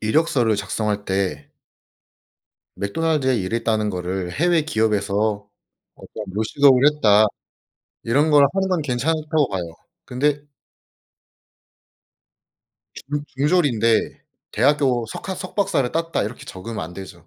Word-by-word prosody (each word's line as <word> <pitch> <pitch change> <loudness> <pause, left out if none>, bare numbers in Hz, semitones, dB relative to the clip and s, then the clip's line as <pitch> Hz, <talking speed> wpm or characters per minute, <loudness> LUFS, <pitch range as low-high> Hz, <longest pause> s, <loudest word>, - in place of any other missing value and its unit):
이력서를 120 -2 +2
작성할 105 0 -2
때 95 -7 -2 1.2
맥도날드에 135 +4 0
일했다는 110 +1 -1
거를 90 -1 -4
'해외 170 - +2
기업에서 105 -5 0 0.5
어떤 105 - -9
요식업을 130 +5 +3
했다.' 110 -6 +5 0.8
이런 145 +7 +2
걸 145 -1 +7
하는 195 0 0
거는 180 -3 +1
괜찮다고 150 +2 0
봐요. 95 -3 -2 0.4
근데 145 +3 0 2.5
중 145 +1 -5
중졸인데 135 -7 +1 0.3
'대학교 130 -1 +2
석학 190 -1 -6
석박사를 185 -9 -1
땄다.' 165 0 -1
이렇게 110 +4 -6
적으면 110 +4 -7
안 85 - -10
되죠. 90 -2 -11
120 Hz, 255 characters per minute, -21 LUFS, 105-150 Hz, 2.5 s, 걸